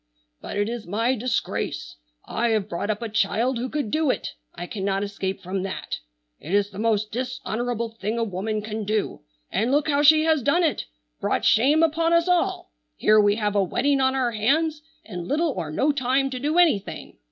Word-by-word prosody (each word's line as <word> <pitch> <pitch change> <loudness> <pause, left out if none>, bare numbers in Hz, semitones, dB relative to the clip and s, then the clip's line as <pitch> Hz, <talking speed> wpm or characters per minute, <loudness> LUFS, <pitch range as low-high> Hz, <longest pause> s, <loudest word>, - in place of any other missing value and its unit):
"But - - -6
it 205 0 +1
is 230 -3 -5
my 225 +7 +1
disgrace. 235 - -3 0.3
I 235 +2 -1
have 215 -3 +1
brought 200 +2 -4
up 215 +2 -2
a - - -2
child 225 +4 0
who 255 +2 -3
could 290 -8 -3
do 310 -2 +1
it. - - -2 0.2
I 175 - -5
cannot 195 0 -2
escape 195 -1 -4
from 185 +2 -3
that. 195 0 -4 0.4
It 180 - -2
is 205 0 +1
the 195 - -9
most 215 -1 +1
dishonorable 240 -1 -3
thing 220 0 -4
a 230 - +1
woman 210 +1 -3
can 215 0 -4
do. 210 +1 -2 0.3
And 230 +5 0
look 290 +2 +2
how 290 -1 +2
she 310 +1 +6
has 320 -2 +2
done 315 +8 +2
it, 315 - 0 0.3
brought - - 0
shame 285 +8 +4
upon 330 +1 +2
us 335 +1 +3
all! 355 - 0 0.3
Here 215 0 +5
we 205 0 +3
have 210 -2 -1
a 200 - +4
wedding 275 +9 +1
on 260 0 +2
our 255 -3 +1
hands, 300 +8 +1 0.2
and 180 -5 -6
little 310 +3 +1
or 175 - -4
no 275 - +2
time 270 0 0
to 255 - -4
do 300 +5 0
anything! 230 - +1
230 Hz, 200 wpm, -24 LUFS, 205-280 Hz, 0.4 s, she